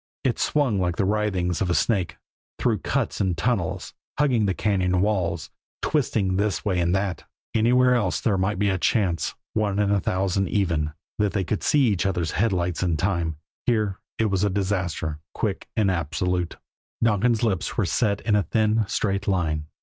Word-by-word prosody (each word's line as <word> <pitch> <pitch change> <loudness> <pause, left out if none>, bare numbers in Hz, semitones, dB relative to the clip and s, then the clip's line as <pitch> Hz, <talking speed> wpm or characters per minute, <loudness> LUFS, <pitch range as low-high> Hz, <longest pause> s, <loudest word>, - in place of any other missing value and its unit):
It 130 -4 0
swung 135 -9 +1
like 90 -2 0
the 95 - +1
writhings 95 -4 0
of 95 - +1
a 85 - +2
snake, 90 -8 +1 0.4
through - - +1
cuts - - -1
and 90 -4 0
tunnels, 100 -3 -1 0.2
hugging 125 -8 +2
the 95 - 0
cañon 95 -3 +1
walls, 95 -6 0 0.3
twisting 110 -10 +1
this 100 -2 0
way 95 -3 +1
and 85 +1 +2
that. 95 -2 -2 0.3
Anywhere 125 +3 +4
else 100 -9 +1
there 105 - +1
might 95 +2 0
be 100 +1 +2
a 95 - -1
chance, 90 - +1 0.2
one 105 -2 0
in 105 -1 +2
a 100 - +3
thousand 95 +1 0
even, 85 -7 0 0.3
that 105 -1 +1
they 100 -3 0
would 105 - -1
see 150 - +3
each 100 -7 +2
other's 85 -4 -1
headlights 90 -4 0
in 85 -3 +1
time 85 -3 -1 0.3
here 105 -5 +1 0.2
it 110 - +2
was 95 -1 +1
disaster 95 -6 -1 0.2
quick - - -2
and 100 -3 +3
absolute. 90 +1 -1 0.5
Donkin's 115 +1 +2
lips 100 -6 -1
were 110 - +2
set 100 +5 +1
in 110 -2 +1
a 105 - +4
thin, 110 +4 +1
straight 100 0 -1
line. 80 -6 0
95 Hz, 175 wpm, -24 LUFS, 90-105 Hz, 0.5 s, Anywhere